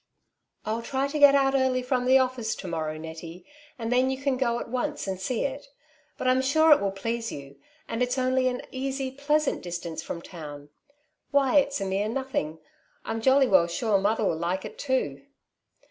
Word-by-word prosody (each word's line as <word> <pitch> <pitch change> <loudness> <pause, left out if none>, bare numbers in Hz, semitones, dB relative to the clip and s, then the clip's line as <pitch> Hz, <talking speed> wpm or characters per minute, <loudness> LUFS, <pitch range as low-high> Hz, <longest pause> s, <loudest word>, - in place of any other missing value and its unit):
'' - - -45
I'll 220 +2 -1
try 265 +3 -1
to 300 +2 -3
get 285 -1 +8
out 270 -1 +3
early 260 -1 +2
from 250 -1 0
the 260 +1 +5
oiSBce 255 -4 +1
to 190 - -7
morrow, 160 -2 -3
Nettie, 165 +2 -9 0.3
and 230 -1 -4
then 255 +1 +3
you 265 - -1
can 275 0 0
go 240 -2 0
at - - -6
once 245 +1 -2
and 190 -2 -3
see 225 +5 -1
it; 280 +1 -5 0.5
but - - -2
I'm 255 +1 +4
sure 315 +4 +4
it 295 - +7
will 200 - +1
please 230 +4 -3
you, 140 0 -9 0.3
and 230 - -3
it's 250 +1 0
only 255 0 +2
an 250 0 -2
easy, 265 0 -3
pleasant 290 +2 0
distance 170 -2 -5
from 170 - -6
town. 145 -4 -9 0.6
Why 280 -1 +3
it's 275 -2 -1
a - - -1
mere 195 +2 -1
nothing. 235 - -2 0.5
I'm 225 - -3
jolly 265 +3 +5
well 185 -6 +5
sure 205 +3 +1
mother 210 +2 +1
will 165 - +1
like 180 +3 -2
it - - -9
too.'' 255 - -1
245 Hz, 200 wpm, -26 LUFS, 190-265 Hz, 0.6 s, get